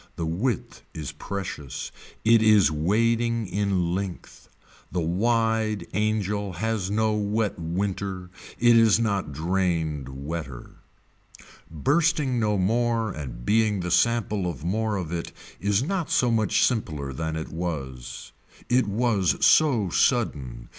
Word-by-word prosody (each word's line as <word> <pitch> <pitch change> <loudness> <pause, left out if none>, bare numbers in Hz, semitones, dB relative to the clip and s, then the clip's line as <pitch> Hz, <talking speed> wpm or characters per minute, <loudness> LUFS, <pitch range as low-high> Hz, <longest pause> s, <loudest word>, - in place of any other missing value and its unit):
The 85 - -3
width 95 +8 -2
is 75 -3 -5
precious. 90 -9 -6 0.3
It 115 0 +6
is 105 -7 +5
wading 115 +8 +1
in 95 -2 0
length. 95 -1 -6 0.4
The 90 - -1
wide 110 +4 +1
angel 105 -1 -1
has 110 -1 -2
no 110 +1 +1
wet 105 -1 -1
winter. 90 +1 -3 0.3
It 120 -1 +5
is 115 -1 +5
not 100 -9 -1
drained 80 -3 -1
wetter. 70 -1 -6 1.0
Bursting 145 - +1
no 105 -2 +1
more 115 +2 +1
and 60 -7 -7
being 105 -3 +2
the 90 0 -3
sample 105 -5 +2
of 75 -4 -7
more 110 +3 0
of 90 -5 -4
it 85 -1 -4 0.3
is 100 +3 +1
not 180 0 -2
so 125 -2 +2
much 110 -4 +3
simpler 75 - -2
than 80 +3 -3
it 80 - -4
was. 70 -7 -5 0.4
It 125 -2 +3
was 100 -5 +1
so 125 - +4
sudden. 70 - 0
100 Hz, 125 wpm, -25 LUFS, 85-115 Hz, 1.0 s, It